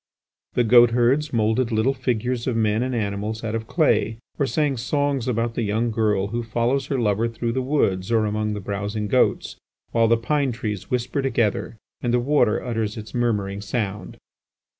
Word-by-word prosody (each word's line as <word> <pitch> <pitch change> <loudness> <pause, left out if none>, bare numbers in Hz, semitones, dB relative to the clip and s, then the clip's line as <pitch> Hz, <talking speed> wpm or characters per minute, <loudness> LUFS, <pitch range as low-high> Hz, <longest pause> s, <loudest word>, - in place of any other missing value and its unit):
The 120 - +2
goat 120 +1 +7
herds 135 +6 +2
moulded 115 +2 +1
little 110 +5 +2
figures 125 -1 -2
of 125 - 0
men 110 0 +1
and 130 0 -1
animals 105 +1 -3
out 110 -1 -3
of 110 0 -3
clay, 140 -8 +2 0.2
or 140 - +2
sang 145 -1 0
songs 140 +1 -1
about 115 -1 0
the 120 - -2
young 110 +2 0
girl 105 -3 +1
who 120 +3 -2
follows 120 +4 0
her 140 - -1
lover 110 -1 +1
through 115 0 -3
woods 115 -8 0
or 110 -2 +3
among 105 0 -1
the - - -4
browsing 100 +2 -3
goats - - +1 0.3
while 115 -1 +3
the 115 +1 +4
pine 140 +3 0
trees 105 -4 -5
whisper 125 +3 -1
together 115 -4 -1 0.2
and 120 - 0
the 120 - +3
water 130 -4 +2
utters 115 -3 -2
its 105 -1 -8
murmuring 105 -5 -1
sound. 105 -1 -4
115 Hz, 180 wpm, -23 LUFS, 105-125 Hz, 0.3 s, goat